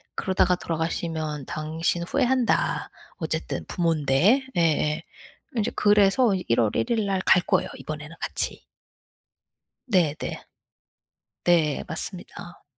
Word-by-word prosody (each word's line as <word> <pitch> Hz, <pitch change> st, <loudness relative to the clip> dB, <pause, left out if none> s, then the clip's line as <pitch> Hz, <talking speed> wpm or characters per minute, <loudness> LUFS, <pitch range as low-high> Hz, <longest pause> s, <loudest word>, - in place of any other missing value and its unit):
"그러다가 185 Hz, -1 st, +2 dB
돌아가시면 160 Hz, -3 st, -3 dB
당신 160 Hz, +3 st, -2 dB
후회한다. 250 Hz, +5 st, +1 dB, 0.3 s
어쨌든 -, -, -3 dB
부모인데." 165 Hz, -, +2 dB
예예. 160 Hz, -1 st, +2 dB, 0.6 s
이제 215 Hz, -, 0 dB
그래서 205 Hz, +2 st, +4 dB
1 120 Hz, -11 st, 0 dB
월 110 Hz, -3 st, +3 dB
1 -, -, 0 dB
일날 200 Hz, -4 st, +1 dB
갈 180 Hz, -, +6 dB
거예요, -, -, +1 dB
이번에는 155 Hz, +1 st, -7 dB
같이. -, -, -2 dB, 1.2 s
네네. 180 Hz, -, +2 dB, 1.3 s
네. 160 Hz, -5 st, +2 dB
맞습니다. 175 Hz, -1 st, -7 dB
170 Hz, 230 characters per minute, -25 LUFS, 155-195 Hz, 1.3 s, 갈